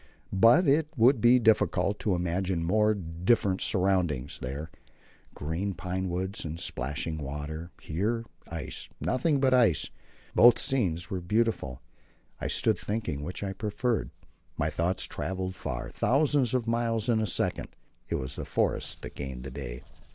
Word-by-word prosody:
But 115 - +6
it 145 +3 +4
would 120 +1 +5
be 120 +3 +7
difficult 105 -4 +2
to 100 -4 +1
imagine 90 0 -1
more 105 +5 +3
different 95 +3 +1
surroundings: 90 - 0
there, 70 +5 -5 0.6
green 85 +6 -3
pinewoods 95 +2 -3
and 80 +1 -5
splashing 80 0 -3
water; 75 +4 -5
here, 110 +9 -2 0.2
ice, 80 -5 -5
nothing 140 +3 +1
but 130 -1 +3
ice. 115 - +3 0.4
But - - +2
both 120 0 +9
scenes 95 - +1
were 95 -2 -2
beautiful; 105 - 0 0.6
I - - -2
stood - - +2
thinking 100 -9 -3
which 90 +6 -5
I 95 -1 -2
preferred. 105 - -1 0.5
My 75 -1 0
thoughts 85 +4 0
travelled 95 0 -3
far - - -5
thousands 135 -2 +2
of 125 -3 0
miles 115 -1 0
in 115 -2 +3
a 110 - 0
second. - - -1 0.4
It - - 0
was 65 - -4
the - - -3
forest - - -1
that - - -7
gained 65 -3 -6
the 70 - -7
day. 60 -3 -7
95 Hz, 150 wpm, -29 LUFS, 80-115 Hz, 0.6 s, both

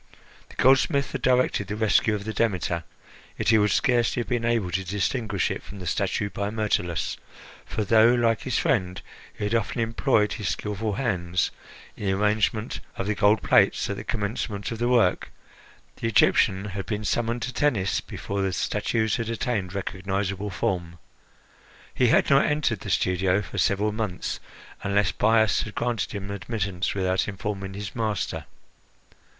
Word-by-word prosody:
The - - -15
goldsmith 135 +2 +3
had - - -4
directed 125 -6 +2
the 100 - -3
rescue 110 0 +2
of 100 - -5
the 110 +1 -4
Demeter, 90 -7 0 0.5
yet - - 0
he 110 -1 +6
would 105 0 +3
scarcely 120 +1 +2
have - - -6
been 120 -2 -1
able 115 -6 +1
to 95 +3 -1
distinguish 100 +2 -1
it - - -4
from 100 - -11
the 90 - -7
statue 100 +3 -1
by 100 +2 -2
Myrtilus; 90 -6 -1 0.5
for 110 - -2
though, 110 +3 +5
like 115 -2 +2
his 130 - -1
friend, 90 -6 0 0.3
he - - -7
had 105 +2 -1
often 115 +1 0
employed 115 -1 +1
his 105 -8 -3
skilful 105 +3 -2
hands 90 -7 0 0.4
in 105 - -7
the 95 - +2
arrangement 105 +3 0 0.2
of 95 - -3
the 105 - 0
gold 105 +1 +3
plates - - +4
at - - -2
the - - -7
commencement 105 -1 -3
of 115 - -5
the 120 - +1
work, 115 -8 +2 0.7
the - - -2
Egyptian 100 -3 +3
had 95 -1 -5
been 105 -1 -3
summoned 115 +2 0
to 125 +3 -4
Tennis 115 -10 +1
before 100 0 -4
the 95 -1 0
statues 110 +3 0
had 115 -1 -3
attained 105 -5 -2
recognisable 100 +1 -2
form. 85 -3 -2 1.0
He 125 - +3
had - - +4
not 140 - +6
entered 150 -8 0
the - - -7
studios 90 +2 +1
for - - -5
several 105 +2 +2
months, 105 -4 -3 0.4
unless 100 -2 +1
Bias 110 -2 +3
had 105 - -7
granted 120 -3 -1
him 100 -1 -5
admittance 100 -3 -3
without 95 -1 0
informing 100 -1 -4
his 100 -2 -6
master. 110 -4 -2
105 Hz, 165 wpm, -25 LUFS, 95-115 Hz, 1.0 s, he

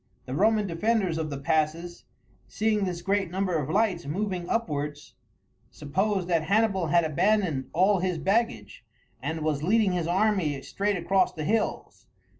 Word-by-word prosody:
The 130 - -6
Roman 210 +6 +2
defenders 190 -1 0
of 155 -1 -3
the 140 - -4
passes, 160 +3 -1 0.4
seeing 215 -2 0
this 175 -2 -4
great 195 -2 0
number 185 0 -1
of 140 - -4
lights 195 -6 0
moving 185 +2 -3
upwards, 150 -9 -3 0.6
supposed 190 +5 -1
that 165 -3 +1
Hannibal 200 -2 +2
had 170 +2 +3
abandoned 170 -3 +1
all 190 +3 +3
his 180 -1 -1
baggage, 155 - -1 0.4
and 160 +4 -3
was 150 -2 -1
leading 205 +4 +2
his 175 -2 -1
army 185 -6 +1
straight 200 0 -1
across 185 +2 +1
the 155 - -5
hills. 215 +3 -2
180 Hz, 150 wpm, -27 LUFS, 155-205 Hz, 0.6 s, had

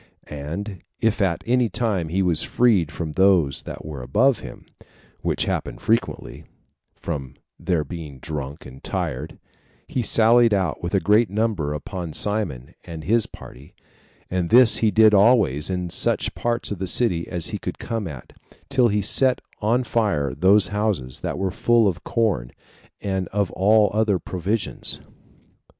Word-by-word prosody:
And 85 +7 -6 0.2
if 110 -1 +1
at 95 -4 0
any 125 -1 +2
time 105 -9 -1
he 95 +4 0
was 85 -4 +2
freed 105 -10 +2
from 80 -3 -5
those 90 -6 +2
that - - -9
were 75 -4 -7
above 115 - +2
him, - - -11 0.5
which - - -1
happened - - -3
frequently, 115 +2 -2 0.5
from 70 -6 -6 0.2
their 85 -5 0
being 75 -2 -8
drunk 75 -1 -6
and 65 0 -13
tired, 75 +6 -4 0.5
he 130 - -2
sallied 115 0 +4
out 95 -5 -1
with 85 +2 -2
a - - +4
great 105 +5 +3
number 100 -8 -1
upon 85 +1 -6
Simon 90 - -2
and 80 -3 -8
his 115 +4 +2
party; 70 +4 -14 0.5
and 90 -2 -2
this 120 -1 +7
he 110 - +3
did 110 0 +5
always 100 - +4
in 90 -2 -3
such - - +1
parts 120 -1 -2
of 100 - -4
the 95 - -2
city 90 -5 +1
as 85 -2 -1
he - - -4
could - - -5
come 115 -4 -4
at, 70 -6 -10 0.4
till 130 -3 +3
he 105 -2 0
set 130 +5 +3 0.2
on 115 +4 +1
fire 100 - 0
those 95 +3 +3
houses 100 -11 -2
that - - -4
were 95 0 -1
full 115 +1 +3
of 90 -3 -2
corn, 100 - -1 0.5
and 95 -2 -2
of 100 -2 -1
all 105 +1 +3
other 105 -2 +2
provisions. 95 +5 -3
95 Hz, 160 wpm, -22 LUFS, 80-110 Hz, 0.5 s, this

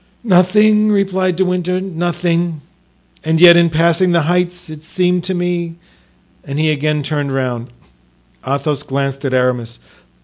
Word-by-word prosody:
"Nothing," 210 +2 +3
replied 190 -2 0
De 190 +2 +1
Winter; 180 0 -1
"nothing; 175 -2 -2 0.6
and 160 0 0
yet 175 0 +8
in 170 0 +4
passing 170 +3 +2
the 170 -2 +2
heights 180 +2 -1
it 155 -1 -11
seemed 180 +1 -1
to 190 0 -1
me——" 175 -1 -3 0.7
and 140 +1 -6
he 155 0 +1
again 150 0 -1
turned 145 -1 -3
round. 125 -3 -3 0.8
Athos 140 +2 -2
glanced 135 0 -3
at 130 - -2
Aramis. 125 -2 -1
170 Hz, 140 wpm, -16 LUFS, 145-180 Hz, 0.8 s, yet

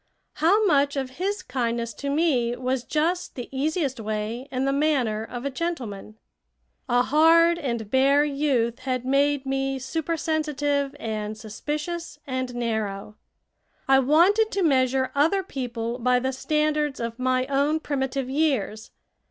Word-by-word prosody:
How 395 +8 +4
much 285 -5 +3
of 265 0 -4
his 405 +2 -1
kindness 235 -2 -2
to 280 +6 -5
me 280 -6 +1
was 255 0 -2
just 330 +6 -1
the 245 - -6
easiest 285 -2 -1
way 220 +4 -3
and 260 +1 -1
the 275 - +1
manner 270 -7 +1
of 245 +3 -7
a 280 - -1
gentleman? 245 - -5 0.7
A 245 0 +4
hard 330 +4 +5
and 235 -8 -3
bare 275 +2 +4
youth 275 -5 0
had 255 -1 -3
made 280 +1 +2
me 270 0 -1
supersensitive 290 -1 -1
and 215 -1 -4
suspicious 300 +10 -5
and 255 -2 -3
narrow. 215 -4 -3 0.7
I 270 0 +6
wanted 350 - +4
to 390 -1 +1
measure 260 -3 +2
other 325 +8 +2
people 240 -6 -4
by 250 +1 +3
the 260 +2 -1
standards 300 +1 0
of 230 0 -4
my 255 0 +1
own 280 +3 +1
primitive 270 -3 -2
years. 265 -7 -1
270 Hz, 140 wpm, -25 LUFS, 245-300 Hz, 0.7 s, I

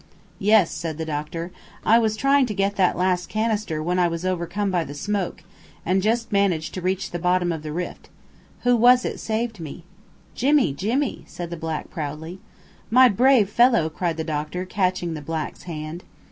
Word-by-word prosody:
"Yes," 210 -3 +4
said 160 -3 -4
the 160 - -3
doctor. 160 +3 -4 0.3
"I 230 +2 +6
was 220 -2 +1
trying 275 +3 +3
to 210 - -4
get 200 +1 0
that 185 -2 +2
last 180 -1 0
canister 215 -8 -1
when 180 +2 0
I 175 - +4
was 170 +1 -4
overcome 185 +3 -1
by 175 -2 +1
the 145 -1 -8
smoke, 190 +1 -3 0.4
and 185 +2 +2
just 230 +3 0
managed 180 -6 +1
to 185 - -4
reach 185 +1 -1
the 175 - -3
bottom 180 0 +1
of 160 -2 -4
the 155 0 -6
rift. 175 +3 -5 0.5
Who 245 0 +4
was 245 +2 +5
it - - -3
saved 225 -1 -2
me?" 165 +1 -8 0.5
"Jimmy 275 - +3
Jimmy!" 235 - -1
said 175 -1 -7
the - - -3
black 160 -1 -5
proudly. 160 +4 -5 0.5
"My 255 +2 +7
brave 245 0 +4
fellow!" 230 -6 +3
cried 170 0 -2
the 160 - -2
doctor, 155 +3 -3
catching 185 -3 -1
the 155 - -6
black's 155 +1 -5
hand. 160 0 -6
180 Hz, 185 wpm, -23 LUFS, 165-215 Hz, 0.5 s, My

